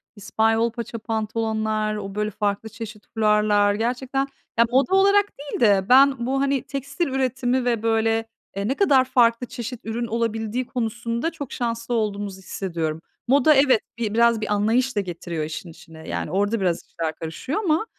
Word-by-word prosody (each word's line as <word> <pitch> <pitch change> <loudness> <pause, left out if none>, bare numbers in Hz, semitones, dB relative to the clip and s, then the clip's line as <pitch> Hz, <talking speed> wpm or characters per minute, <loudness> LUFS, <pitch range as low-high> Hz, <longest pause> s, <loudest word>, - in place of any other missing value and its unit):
İspanyol 225 +2 +1
paça 235 -1 -6
pantolonlar, 220 -1 -1
o 200 -2 -6
böyle 210 0 -1
farklı 210 +1 -2
çeşit 215 0 -9
fularlar 210 -2 +3
gerçekten 255 +5 -1 0.3
ya, 230 - +6
moda 275 +9 +3
olarak 400 +1 +5
değil 285 -1 -5
de, 200 -3 +4
ben 265 -1 +5
bu, 270 +2 0
hani, 275 -1 +1
tekstil 280 +5 -3
üretimi 260 -1 0
ve 235 -3 0
böyle, 225 0 +1 0.3
eee, 200 +1 -2
ne 265 - 0
kadar 280 -9 +4
farklı 240 -1 +3
çeşit 245 0 -6
ürün 235 +1 -3
olabildiği 230 +1 -2
konusunda 235 +4 -2
çok 285 -6 -7
şanslı 230 0 -3
olduğumuzu 205 -3 -2
hissediyorum. 165 -4 -4 0.3
Moda, 280 +4 +5
evet 265 -4 +4 0.2
bi 220 -3 -2
biraz 235 -1 +3
bir 215 - -1
anlayış 230 +5 +1
da 205 - +2
getiriyor 175 -3 -5
işin 155 +3 -6
içine. 160 0 -13
Yani, - - -3
orada 205 +4 +1
biraz 175 -3 0
işler 160 -1 -4
karışıyor 165 - -4
ama, 330 +3 +1
225 Hz, 165 wpm, -23 LUFS, 210-255 Hz, 0.3 s, ya